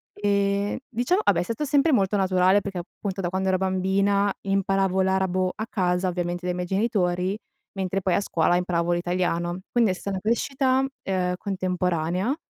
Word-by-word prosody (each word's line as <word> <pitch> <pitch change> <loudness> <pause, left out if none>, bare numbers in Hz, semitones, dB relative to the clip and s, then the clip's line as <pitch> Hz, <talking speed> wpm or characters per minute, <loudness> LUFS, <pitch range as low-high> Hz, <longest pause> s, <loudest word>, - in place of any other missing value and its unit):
Ehm, 200 0 0
diciamo 245 - +1
vabbè, - - +3
è - - +1
stato 230 +10 -3
sempre 285 +3 +3
molto 205 -5 +2
naturale, 190 +1 +3
perché 195 -2 -5
appunto 195 +2 -5
da 175 - -1
quando 190 +1 -1
ero 185 - +2
bambina 195 +2 +1
imparavo 195 -1 +1
l'arabo 190 -1 +1
a 220 - -4
casa, 180 -2 0
ovviamente 175 0 -3
dai 180 0 -1
miei 180 0 -3
genitori, 190 -2 0 0.4
mentre 190 0 -2
poi 185 -2 +1
a - - +2
scuola 175 -3 +1
imparavo 175 -1 0
l'italiano. 175 0 -1
Quindi 235 -5 +3
è - - 0
stata 190 +1 -4
crescita, 260 +5 +1 0.2
ehm, 185 -2 0
contemporanea, 180 - -1
190 Hz, 165 wpm, -25 LUFS, 180-200 Hz, 0.4 s, vabbè